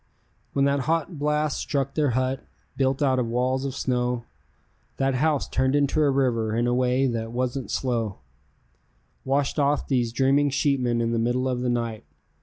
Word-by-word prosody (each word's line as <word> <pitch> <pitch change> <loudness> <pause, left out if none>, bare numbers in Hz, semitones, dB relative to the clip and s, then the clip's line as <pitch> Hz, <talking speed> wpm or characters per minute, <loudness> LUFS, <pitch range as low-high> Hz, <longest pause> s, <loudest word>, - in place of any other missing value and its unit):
When 140 0 +2
that 140 0 +2
hot 165 0 -1
blast 150 0 0
struck 140 -1 -2
their 150 -2 +1
hut, 130 0 -1 0.3
built 135 +1 +1
out 130 -2 +2
of 120 - 0
walls 130 +3 0
of 135 -1 -3
snow, 125 -2 -1 0.7
That 135 0 +1
house 150 +2 +1
turned 130 +1 +1
into 145 +2 +2
a 145 - +4
river 120 -5 +1
in 120 +1 +1
a 120 - +1
way 125 +1 +2
that 115 -3 -2
wasn't 125 +1 -2
slow; 115 -6 -1 1.1
Washed 140 +2 0
off 145 +1 +1
these 120 -4 +1
dreaming 135 +4 +3
sheepmen 130 -4 +1
in 115 0 0
the 115 - 0
middle 120 +3 0
of 125 -1 -1
the 125 - 0
night. 115 -2 -2
130 Hz, 175 wpm, -25 LUFS, 120-140 Hz, 1.1 s, a